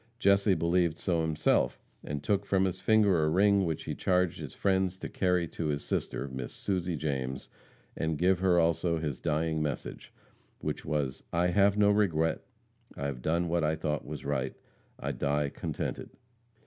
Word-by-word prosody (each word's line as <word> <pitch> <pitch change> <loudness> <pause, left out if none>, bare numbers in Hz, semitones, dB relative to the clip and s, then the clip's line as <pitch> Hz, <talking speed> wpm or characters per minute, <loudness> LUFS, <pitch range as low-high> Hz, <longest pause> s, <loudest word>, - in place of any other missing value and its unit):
Jesse 100 -2 +4
believed 85 -1 +1
so 85 -3 0
himself, 80 -1 +1 0.2
and 75 0 -4
took 100 +6 +1
from 95 -1 +3
his 95 0 -3
finger 100 -7 +4
a 75 - +2
ring 100 +3 +4
which 80 -2 -2
he - - -4
charged 90 -2 +1
his - - -7
friends 95 -1 +1
to - - -5
carry 90 -2 +1
to 80 - -3
his 70 -1 -1
sister, 70 - -2
Miss 65 -2 -6
Susie 90 -3 -2
James, 65 -4 -3 0.5
and 80 -1 -1
give 90 +2 +3
her 90 -2 +3
also 85 0 +2
his 75 -4 -3
dying 80 +1 0
message, 75 -1 -4 0.5
which - - -4
was, 70 -4 -1
"I 85 +1 +2
have 100 +2 +3
no 105 -1 +5
regret. 80 -7 +1 0.6
I've 70 -3 -3
done 85 +5 +1
what 85 0 +1
I 80 +1 +2
thought 75 -1 -2
was - - -7
right. 65 0 -1 0.4
I - - -2
die 75 0 0
contented." - - -4
85 Hz, 170 wpm, -30 LUFS, 75-95 Hz, 0.6 s, no